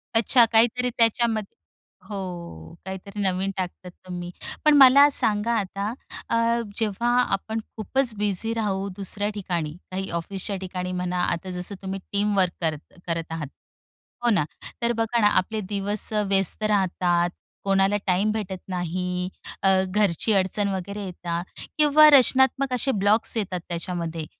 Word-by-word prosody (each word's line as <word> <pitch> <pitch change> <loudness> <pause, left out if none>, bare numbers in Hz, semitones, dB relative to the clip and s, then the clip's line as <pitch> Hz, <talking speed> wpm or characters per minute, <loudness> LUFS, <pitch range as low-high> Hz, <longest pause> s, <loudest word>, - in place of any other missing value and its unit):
अच्छा, 235 +2 +5
काहीतरी 235 +2 +2
त्याच्यामध्ये 225 -2 +1 0.5
हो, 175 - -7
काहीतरी 190 +2 -6
नवीन 190 0 0
टाकतात 180 0 -5
तुम्ही. 175 -1 -6 0.4
पण 300 - +7
मला 280 +2 +8
सांगा 220 -2 +2
आता, 200 +2 -3 0.4
अ, 230 +1 +2 0.2
जेव्हा 225 +2 0 0.2
आपण 220 +3 -2 0.2
खूपच 240 +3 0
बिझी 210 +2 0
राहू 200 -3 -1
दुसऱ्या 205 +1 -1
ठिकाणी, 175 -6 -3 0.2
काही 190 +1 -4
ऑफिसच्या 195 +3 -4
ठिकाणी 180 -1 -4
म्हणा. 180 0 -2
आता 170 +2 -2
जसं 180 +3 -4
तुम्ही 195 0 -4
टीम 205 0 0
वर्क 185 -2 +3
करत 155 -2 -3
करत 165 -1 -3
आहात, 160 -3 -4 0.8
हो 240 - +3
ना? 205 -8 +3 0.4
तर 235 - +1
बघा 225 +1 0
ना, 210 - +6
आपले 215 +2 0
दिवस 205 +2 0
व्यस्त 200 -1 +2
राहतात, 180 -4 +1 0.3
कोणाला 195 +1 +2
टाईम 195 +4 +2
भेटत 195 -4 -4
नाही, 180 0 -2 0.3
अ, 195 - +5 0.2
घरची 205 +1 +1
अडचण 195 +1 +1
वगैरे 200 +2 -5
येतात 175 -1 -4 0.3
किंवा 305 0 +7
रचनात्मक 265 -1 +4
असे 260 +2 +1
ब्लॉक्स 210 +1 +3
येतात. 185 -4 -2
त्याच्यामध्ये 170 -2 -4
195 Hz, 140 wpm, -24 LUFS, 180-220 Hz, 0.8 s, मला